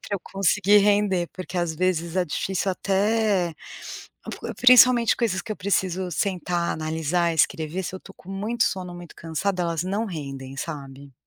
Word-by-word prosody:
pra 200 - -4
eu - - -10
conseguir 200 +2 +3
render, 200 -4 +2
porque, 185 0 -5
às 170 -2 -1
vezes, 170 0 -1
é 180 - +2
difícil 190 +4 -2
até 195 -2 +1 1.1
principalmente 250 -2 +7
coisas 210 -6 0
que 230 - -11
eu - - -8
preciso 190 -2 -1
sentar, 180 -3 -1
analisar, 160 +2 -1
escrever, 160 +2 0
se - - -5
eu 185 - -5
tô - - -14
com 190 - -13
muito 215 +4 -1
sono, 180 -2 -3
muito 175 -2 -11
cansada, 180 +3 -2
elas 170 -1 -1
não 200 +4 -1
rendem, 135 -6 -7
sabe. 140 -2 -7
185 Hz, 160 wpm, -24 LUFS, 165-200 Hz, 1.1 s, principalmente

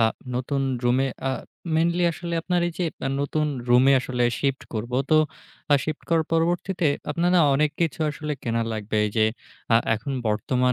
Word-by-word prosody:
আ - - +5 0.3
নতুন 135 +3 -1 0.2
রুমে 125 +2 +3 0.2
আ - - +1 0.4
মেইনলি 170 +2 +2
আসলে 170 +1 -5
আপনার 180 0 +1
এই - - -6
যে 180 - +1 0.2
আ - - 0
নতুন 150 +2 0 0.2
রুমে 125 +3 +6
আসলে 125 -1 -2 0.2
শিফট 135 -1 0
করবো। 120 +3 -2
তো 155 - +5 0.6
আ - - +8
শিফট 155 -1 -4
করার 165 -2 +2
পরবর্তীতে 170 +2 +1 0.2
আপনার 170 +4 +1
না - - +6
অনেক 150 +2 +2
কিছু 165 -2 0
আসলে 150 0 -4
কেনা 115 -1 0
লাগবে 110 -1 -5
এই - - -3
যে 110 - +5 0.5
আ - - +7 0.2
এখন 115 +5 -4
বর্তমান 125 +4 +1
140 Hz, 180 wpm, -24 LUFS, 125-165 Hz, 0.6 s, আ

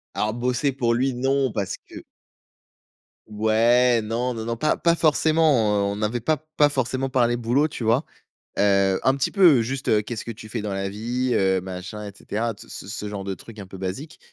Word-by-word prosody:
Alors 105 +1 0
bosser 125 +3 0
pour 120 -3 +1
lui 130 +1 0
non, 135 0 +1
parce 100 -4 -3
que - - -10 1.2
Ouais, 115 +3 +3
non, 120 +3 -2
non, 115 -1 -5
non, 115 0 -3
pas 155 +5 +1
pas 170 0 +2
forcément, 155 -9 +3
heu, - - -2
on - - -5
n'avait 110 +3 -1
pas 155 +7 +1 0.2
pas 150 - +6
forcément 130 -1 -1
parlé 120 -2 +2
boulot, 125 +6 +1
tu 120 -5 -5
vois? 120 +7 +3 0.6
Heu, 100 -1 +3
un 130 +1 +3
petit 140 - -1
peu 175 - +6
juste, 130 +4 -4
heu,: 105 -1 +4
«Qu'est-ce 115 -1 -6
que 115 - -4
tu 110 0 -11
fais 115 0 -3
dans 105 -1 -3
la 95 0 -2
vie?», 120 +5 -2
heu, 95 -1 +2
machin, 95 +3 -7
et - - -7
cetera, 115 +3 -3
ce - - -13
ce - - -9
ce 105 0 -5
genre 100 -2 -5
de 95 - -3
trucs 110 +2 -12
un 100 - -7
peu 95 - -10
basiques, 95 - -6
115 Hz, 210 wpm, -23 LUFS, 105-130 Hz, 1.2 s, pas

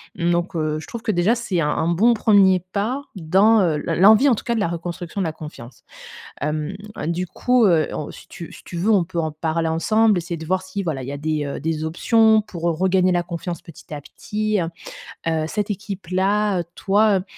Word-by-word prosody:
Donc, 175 +1 -1
heu, 155 -1 -1
je - - -10
trouve 235 -2 -7
que 220 - 0
déjà 190 +6 +2
c'est 215 -7 -2
un 150 - +1
un 160 - 0
bon 225 +8 +3
premier 195 -4 +4
pas 240 +8 -1
dans, 195 +6 +4
heu, 165 -4 +2
l - - -1
l'envie 220 +7 +7
en - - +5
tout - - -7
cas 235 - -1
de - - 0
la 200 - +1
reconstruction 175 +2 -5
de - - 0
la 155 - -4
confiance. 150 -6 -11 0.6
Hem, 150 +4 -2 0.3
du 175 +2 -2
coup, 250 +2 +2
heu, 165 -5 +3
on 150 - -5
si - - -14
tu 170 - -9
si - - -13
tu 175 - -9
veux 205 +6 +1
on 190 -5 +3
peut 170 -1 -4
en 155 -1 -2
parler 160 +1 -1
ensemble, 215 +5 +2
essayer 170 0 -3
de 160 - -8
voir 185 +2 0
si 190 +1 -5
voilà, 150 -6 -3
il - - -7
y - - -4
a - - -5
des, 155 0 -2
heu, 140 - -5
des 160 0 -2
options 220 +6 +3
pour 175 -5 -10
re 170 -2 +1
regagner 185 0 +2
la 175 0 +1
confiance 175 0 -5
petit 165 -2 -13
à 145 - -6
petit. 215 +5 -3
Heu 165 - -2 0.6
heu, 160 -1 0
cette 210 +3 -2
équipe-là, 195 0 -1
heu, - - -1
toi, 200 0 +3
heu - - -6
180 Hz, 230 wpm, -21 LUFS, 160-210 Hz, 0.6 s, l'envie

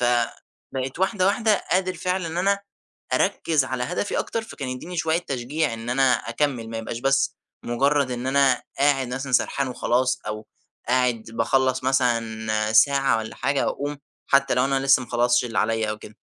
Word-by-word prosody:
فبقيت 125 +3 -2
واحدة 190 0 +1
واحدة 215 +1 +2
قادر 185 0 +1
فعلًا 185 -1 -2
إن 165 +1 -5
أنا 200 +2 +2 0.5
أركز 155 -5 +1
على 130 -1 -3
هدفي 180 +7 -2
أكتر، 230 - -2
فكان 140 -11 -7
يديني 160 +8 -6
شوية 160 0 +1
تشجيع 140 -2 -2
إن 115 +1 -6
أنا 130 0 +3
أكمّل، 115 -1 -1
ما 115 - -4
يبقاش 115 +1 -5
بس 135 +1 +1 0.3
مجرد 140 +3 +1
إن 125 +1 -4
أنا 135 0 +3 0.2
قاعد 135 -2 +2
مثلًا 135 0 -5
سرحان 135 +1 +1
وخلاص، 125 0 0
أو 105 0 -5 0.4
قاعد 125 -2 +1
باخلّص 130 +3 +1
مثلًا 110 -4 0
ساعة 135 +1 +4
والّا 110 +1 -6
حاجة، 140 0 0
وأقوم 145 0 -4 0.3
حتى 140 0 +3
لو 125 +1 +2
أنا 135 0 0
لسه 135 -1 +4
ما 125 - -10
خلصتش 120 0 +2
اللي 115 - -3
عليَّ 110 0 +1
أو 110 - -4
كده. 105 - -13
130 Hz, 170 wpm, -24 LUFS, 120-145 Hz, 0.5 s, ساعة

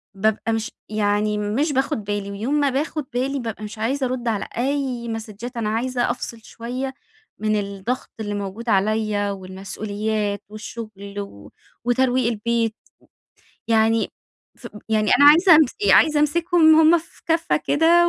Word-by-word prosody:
بابقى 220 +2 0
مش 225 -1 -2 0.2
يعني 210 0 +1
مش 240 +9 0
باخد 265 -4 0
بالي، 200 0 -3
ويوم 220 +8 -3
ما 285 -2 +3
باخد 295 +2 -2
بالي 270 +3 -1
بابقى 225 -3 -5
مش 210 +1 -7
عايزة 260 +4 0
أرد 245 -1 -4
على 215 -3 -1
أي 260 -2 -1
ماسدجات، 225 +2 -6
أنا 215 -2 -1
عايزة 245 +2 0
أفصِل 235 -1 -6
شوية 255 +3 -5 0.5
من 215 0 +1
الضغط 200 +5 -4
اللي 205 -1 -3
موجود 205 +4 -5
عليَّ، 205 0 +1
والمسؤوليات، 205 +2 -3
والشغل، 210 -2 -8
و 100 - -9 0.3
وترويق 250 0 +2
البيت، 230 0 -1 0.9
يعني 225 0 +3 0.5
ف - - -10 0.2
يعني 215 -1 +1
أنا 285 - +6
عايزة 340 +2 +7
أمس 310 - +4 0.2
عايزة 305 -2 +5
أمسكهم 320 +1 +4
هُم 325 +2 +6
في 330 - -16
كفّة 330 0 +2
كده 335 +4 +4
230 Hz, 145 wpm, -22 LUFS, 210-270 Hz, 0.9 s, عايزة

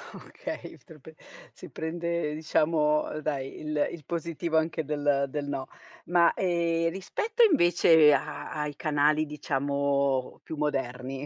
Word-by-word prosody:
Okay, - - -8
te 165 - -13
lo 155 - -16
p 160 +4 -14 0.4
si 180 - -12
prende 170 +1 -3
diciamo 155 -1 +1
dai 140 -3 -4
il 150 -1 0
il 160 - -9
positivo 170 -1 -2
anche 160 0 0
del 145 -1 0
del 145 +1 -4
no. 135 -2 -4 0.4
Ma, 175 -1 +4
ehm, 170 -2 0
rispetto 420 - -2
invece 175 - +5
a 150 +2 -3
ai 150 -1 -3
canali 150 +1 +2
diciamo 140 -2 -1
più 160 - -7
moderni 135 -2 -3
150 Hz, 135 wpm, -28 LUFS, 145-165 Hz, 0.4 s, invece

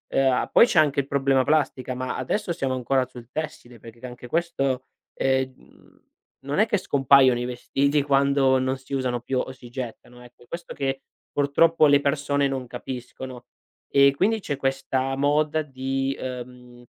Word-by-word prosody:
ehm, 135 -1 +4
a 125 - 0
poi - - +6
c'è 170 - +3
anche 145 -2 +3
il 135 - -12
problema 135 -1 +2
plastica, 130 -4 0
ma 130 0 -3
adesso 170 - -2
siamo 130 -4 -2
ancora 130 +1 +1
sul 120 -1 -13
tessile 135 -7 -6
perché 115 +3 -12
anche 125 0 -9
questo 135 -5 -1 0.3
è 130 0 +1
mhmm, 130 0 -23 0.3
non 140 +7 -2
è 220 - +4
che 205 - +1
scompaiono 135 -6 +4
i 120 - -2
vestiti 140 +4 0
quando 140 -1 +3
non 130 +1 -1
si 130 +1 -12
usano 125 -2 -1
più 130 +2 -2
o 130 - -3
si 125 -2 -13
gettano, 125 -1 -8
ecco. 120 0 -18
È - - -23
questo 170 +1 -7
che 135 -2 -2 0.3
purtroppo 155 +3 +3
le 140 0 +5
persone 140 0 0
non 135 -2 -3
capiscono. 125 0 -8 0.5
E 140 0 +6
quindi 220 +8 +1
c'è 145 -8 -3
questa 135 0 -1
moda 150 +2 +1
di, 135 0 -2
ehm, 125 -1 -8
135 Hz, 175 wpm, -24 LUFS, 125-140 Hz, 0.5 s, poi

